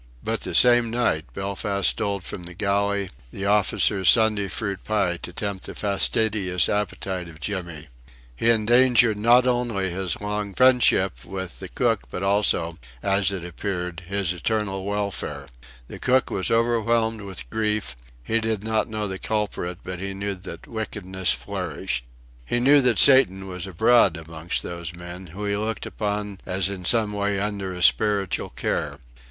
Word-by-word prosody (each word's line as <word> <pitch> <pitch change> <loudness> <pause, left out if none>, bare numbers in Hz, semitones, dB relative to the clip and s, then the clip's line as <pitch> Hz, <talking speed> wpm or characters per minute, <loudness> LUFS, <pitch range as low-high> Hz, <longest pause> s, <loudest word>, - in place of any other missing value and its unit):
But - - -2
the - - -4
same 120 -1 +6
night 115 -10 -1
Belfast 100 0 -2
stole 100 -1 -3
from 90 - -6
the 90 0 -6
galley 100 0 0 0.2
the 95 - -5
officers' 100 -2 +3
Sunday 110 -3 +4
fruit 100 +1 -4
pie, 95 -5 0
to 90 - -8
tempt 100 +1 -4
the - - -8
fastidious 100 -2 +1
appetite 95 -3 -3
of 80 -2 -14
Jimmy. 85 -4 -5 0.5
He 115 - +1
endangered 115 0 +4
not 120 +3 +5
only 120 -7 0
his 90 -2 -3
long 105 -1 -4
friendship 125 -7 +4
with 95 -3 -7
the 95 - -7
cook 115 +1 0
but 90 - -5
also 95 -4 +1 0.2
as 100 0 +2
it 95 -3 -5
appeared 90 0 -4
his 100 -2 -1
eternal 95 +1 -2
welfare. 100 -9 -3 0.4
The - - -9
cook 130 +1 +2
was 95 - +1
overwhelmed 115 -1 +1
with 95 -11 -7
grief; 105 - -1 0.3
he 115 - 0
did 110 -2 -2
not 110 +1 0
know 110 -1 -3
the 95 -1 -5
culprit 105 -5 -3
but 90 -1 -6
he 95 +1 -5
knew 100 +1 -3
that 90 -3 -10
wickedness 95 -5 -2
flourished; - - -3 0.4
he 120 - -1
knew 140 +3 +5
that 125 -3 +2
Satan 95 -9 +6
was 90 0 -5
abroad 95 -1 +4
amongst 80 +1 -4
those 85 -1 -6
men, 90 +1 -9
whom 100 +6 -6
he 100 - 0
looked 110 +2 -3
upon 105 -2 -4
as 95 +1 0
in 95 -3 -6
some 110 -1 +3
way 100 -1 -1
under 100 -2 -3
his 90 -1 +3
spiritual 100 -4 +2
care. 75 -2 -3
100 Hz, 160 wpm, -24 LUFS, 90-110 Hz, 0.5 s, same